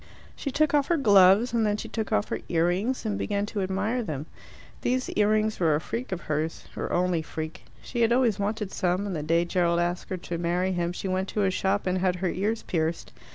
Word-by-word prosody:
She 280 - -4
took 305 +2 +1
off 285 -2 +3
her 340 - +2
gloves, 205 -1 +5
and 230 -1 +2
then 210 -1 +1
she - - -6
took 220 -2 -4
off 105 - +1
her - - -2
ear 165 -1 +2
rings 220 +9 -1
and 210 -2 -1
began 200 0 -1
to 205 -1 -3
admire 195 +6 -1
them. 155 - -4 0.6
These 255 +1 0
ear 210 0 +2
rings 215 0 +1
were 160 -4 +3
a - - +1
freak 235 +9 -5
of 180 -2 -3
hers 155 +1 -3
her - - -4
only 180 -2 +1
freak. 160 0 -6 0.2
She 240 - -3
had 230 0 +4
always 235 -4 +3
wanted 210 0 -2
some, 185 +2 0
and 195 -3 -3
the 155 - -2
day 165 +3 +2
Gerald 170 -1 +1
asked 175 +1 -2
her 185 - -2
to 170 -1 -5
marry 175 +2 0
him 175 -1 -1
she 180 - -5
went 185 +1 -1
to 210 - 0
a 190 - +2
shop 195 +2 0
and 185 0 0
had 185 -1 +1
her 180 0 -1
ears 210 +6 -1
pierced. 165 -1 -2
190 Hz, 240 wpm, -27 LUFS, 175-215 Hz, 0.6 s, gloves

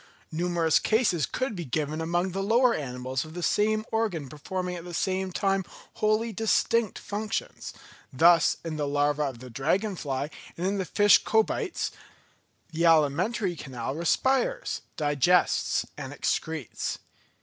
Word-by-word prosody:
Numerous 170 -1 +2
cases 215 - +2
could 255 -4 -2
be 175 - -4
given 155 +3 -2
among 175 +3 0
the 195 +2 -2
lower 235 +4 +4
animals 130 - -3
of 160 +1 -11
the 175 - -4
same 215 +3 +2
organ 200 - -1
performing 180 +5 -4
at 170 - -7
the 175 -1 -7
same 190 +1 -1
time 195 +1 +1 0.4
wholly 215 +2 +2
distinct 225 +1 +1
functions; 210 0 -4 0.4
thus 165 +4 +5
in 160 -2 -3
the 145 -1 -1
larva 145 +1 +1
of 135 -4 -4
the 125 +1 -11
dragon 185 - 0
fly 140 -2 -3 0.3
and 175 - -2
in 200 +1 0
the 190 - -1
fish 205 +4 +5
Cobites 225 - 0 0.8
the 165 +1 -1
alimentary 170 +6 +3
canal 130 -4 -5
respires, 265 - 0 0.2
digests, 150 +4 +2
and - - -7
excretes. 160 -7 -2
175 Hz, 140 wpm, -27 LUFS, 150-210 Hz, 0.8 s, thus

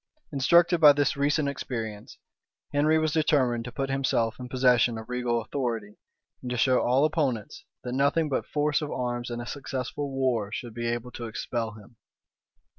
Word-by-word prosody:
Instructed 170 +5 +4
by 150 -2 +9
this 145 0 +1
recent 145 +1 +1
experience, 115 -6 -5 0.6
Henry 150 +2 +3
was 155 -1 +1
determined 130 -7 +2
to 125 - -6
put 135 +2 -3
himself 125 -4 0
in 125 0 -7
possession 125 -2 +3
of 110 - -8
regal 125 -2 -1
authority, 115 -6 -4 0.4
and 125 - -6
to 125 - -2
show 130 +1 +3
all 130 +4 +3
opponents, 140 -9 -2 0.2
that 125 - -4
nothing 140 +4 +2
but 140 - -2
force 150 +1 0
of 150 - -4
arms 120 -2 -3
and 120 0 -4
a - - -9
successful 135 +1 -4
war 130 -6 0
should 120 0 -6
be 120 0 -3
able 120 +1 -3
to 120 - -7
expel 115 0 -3
him. 110 +2 -16
125 Hz, 175 wpm, -27 LUFS, 120-145 Hz, 0.6 s, by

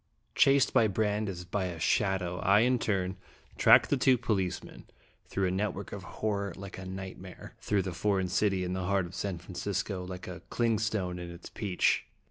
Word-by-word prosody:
ACT - - -44
II. - - -43 0.2
Chased 135 -2 +2
by 110 - +5
Brande 105 0 0
as 90 -2 -6
by 95 +2 -1
a 85 -2 -5
shadow, 90 +1 +1
I 100 +3 +5
in 125 +1 +3
turn 95 -3 -1 0.4
tracked 140 - +6
two 130 -2 +5
policemen, 95 -6 -2 0.4
through 95 - -1
a 90 - +1
net 100 +3 -1
work 100 - -7
of 100 - -6
horror 100 0 -3
like 95 -1 -8
a 95 - -7
nightmare 95 -1 -8
through 100 -2 0
the 90 -1 -4
foreign 95 +2 +1
city 95 0 +1
in 90 0 -2
the 95 -1 -2
heart 95 -1 +1
of 85 - -10
San 95 -1 -3
Francisco, 95 +1 -3
like 90 0 -7
a 90 -1 -7
clingstone 110 -6 0
in 90 0 -6
its 85 0 -10
peach. 100 -5 +1
95 Hz, 195 wpm, -30 LUFS, 90-105 Hz, 0.4 s, tracked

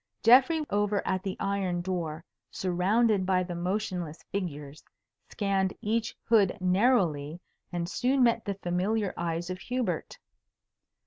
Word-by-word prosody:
Geoffrey 270 +7 +6
over 205 0 +1
at 185 - 0
the 190 -1 -4
iron 190 -3 -1
door, 170 -3 -4 0.2
surrounded 195 +3 +1
by 185 -1 +2
the 175 -1 -5
motionless 180 -2 -3
figures, 150 -6 -5 0.5
scanned 195 -2 0
each 220 +1 -1
hood 215 -5 +3
narrowly 180 - +2 0.3
and 170 -1 -2
soon 255 +7 +1
met 230 -1 +3
the 200 -2 -3
familiar 195 +3 -1
eyes 170 +1 -3
of 185 - -5
Hubert. 250 +2 -3
190 Hz, 125 wpm, -28 LUFS, 175-215 Hz, 0.5 s, Geoffrey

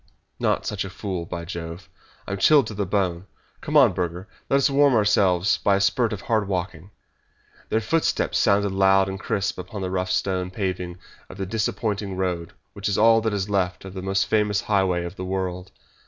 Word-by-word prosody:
"Not - - 0
such 105 -3 -2
a 95 - -6
fool! 95 -3 -5
By 85 -1 -5
Jove, 85 0 -7 0.4
I - - -5
am 100 - -3
chilled 145 +4 +5
to - - -6
the 100 -2 -2
bone! 95 -2 -1 0.3
Come 150 - +1
on, 130 -9 +6
Burger, 90 +1 -3 0.2
let 135 - +4
us 140 - +3
warm 140 -2 +4
ourselves 100 -3 +3
by 100 - +2
a - - +1
spurt 115 +4 +2
of 105 -3 -4
hard 110 -3 0
walking." 90 -2 -4 0.8
Their 110 - +1
footsteps 160 +9 0
sounded 100 -2 +3
loud 95 0 +4
and 95 0 -5
crisp 100 -1 -2
upon 100 +2 -6
the 90 - -3
rough 90 0 -1
stone 90 -1 -1
paving 90 -2 -3 0.3
of - - -10
the 95 - -3
disappointing 105 -1 -2
road 90 -3 -2 0.2
which 100 0 -3
is 100 - 0
all 115 +1 +5
that 110 0 0
is 100 -2 -2
left 95 -3 -1
of 95 - -8
the 95 - -6
most 95 +1 0
famous 105 -2 +1
highway 95 -4 +1
of 85 +3 -8
the 95 - -5
world. 90 -1 -3
95 Hz, 200 wpm, -24 LUFS, 90-105 Hz, 0.8 s, on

